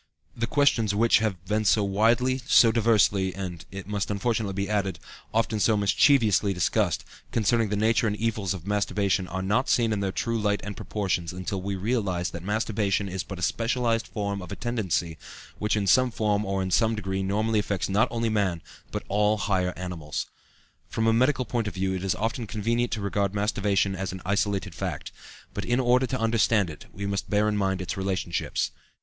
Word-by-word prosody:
The 115 0 -1
questions 115 -6 +2
which 115 +1 +4
have 95 -5 -2
been 105 +2 0
so 105 0 +3
widely, 115 +6 +2
so 115 - +6
diversely, 105 -5 +2
and 90 -3 -5
it 95 0 -7
must 105 0 -2
unfortunately 105 0 -1
be 100 0 -1
added 100 -4 -1 0.3
often 115 -1 0
so 110 +1 +3
mischievously 105 - +3
discussed, 90 - +1 0.3
concerning 115 -1 +2
the 105 - 0
nature 110 +2 +2
and 105 - 0
evils 105 -4 -1
of 90 -2 -10
masturbation 100 -2 0
are 95 +1 -4
not 105 +7 +1
seen 115 -2 +3
in 105 - -1
their 100 -1 -1
true 115 +3 -1
light 105 -1 +1
and 105 -1 -5
proportions 95 -5 -2
until 95 +1 -4
we 100 +1 -3
realize 95 -4 -1
that 85 - -6
masturbation 105 0 0
is 95 -1 -3
but 95 +1 -7
a 90 - -6
specialized 115 +2 0
form 100 -2 -3
of 90 - -9
a - - -3
tendency 95 - -2 0.4
which 105 +1 +1
in 105 -2 0
some 130 +5 +4
form 105 -2 0
or 95 0 -1
in 95 - -3
some 110 +4 +3
degree 95 -2 -3
normally 105 +3 +1
affects 100 -2 -1
not 100 +3 +3
only 115 0 -1
man, 100 -7 0 0.3
but - - -4
all 105 +1 +2
the 100 - -4
higher 90 -2 0
animals. 80 -5 -4 0.6
From 115 - -1
a 115 - +4
medical 130 +2 +2
point 120 -3 -1
of 100 - -5
view 95 0 0
it 95 0 -3
is 95 - 0
often 115 +2 -2
convenient 115 +3 -1
to 110 - -2
regard 100 0 -1
masturbation 100 -2 +1
as 95 -1 -3
an 95 0 -7
isolated 100 -1 0
fact; - - -4 0.4
but - - -3
in 120 +1 +1
order 125 +1 +3
to 130 +1 -2
understand 110 -4 +2
it 75 - -12
we 100 +2 -6
must 100 -1 -2
bear 105 +1 +2
in 105 - +1
mind 95 -2 0
its 90 - -4
relationships. 95 -3 -2
105 Hz, 200 wpm, -26 LUFS, 95-115 Hz, 0.6 s, so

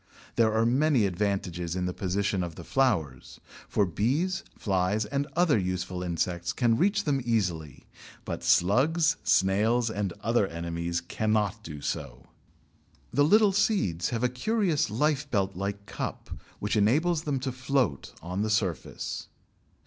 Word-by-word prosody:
There 115 -2 +3
are 110 +1 +2
many 130 -1 +3
advantages 90 -3 -2
in 90 -1 -1
the 90 - -2
position 100 +1 -1
of 85 -2 -6
the - - -9
flowers, 90 - 0 0.3
for 105 - +2
bees, 145 - 0 0.2
flies, 100 +2 0
and 140 +6 -2
other 170 -9 +3
useful 90 -1 -3
insects 85 0 -2
can 120 -3 +2
reach 200 - +2
them 140 -3 0
easily, 90 - -2 0.4
but - - -5
slugs, 155 - +3
snails, 110 +5 +2
and 100 -3 -2
other 115 -3 +2
enemies 85 0 -3
cannot 105 +3 -1
do 75 -3 -8
so. - - -5 0.9
The 145 - +4
little 210 +6 +5
seeds 190 - +1
have 115 -1 -2
a - - +5
curious 160 - 0
lifebelt 125 - 0
like 100 +2 -4
cup, - - -6 0.3
which 105 +1 -2
enables 150 +11 +2
them 140 -3 0
to 130 - -2
float 130 - -1
on 90 +3 -3
the 110 - 0
surface. 100 -6 -2
105 Hz, 140 wpm, -28 LUFS, 90-140 Hz, 0.9 s, little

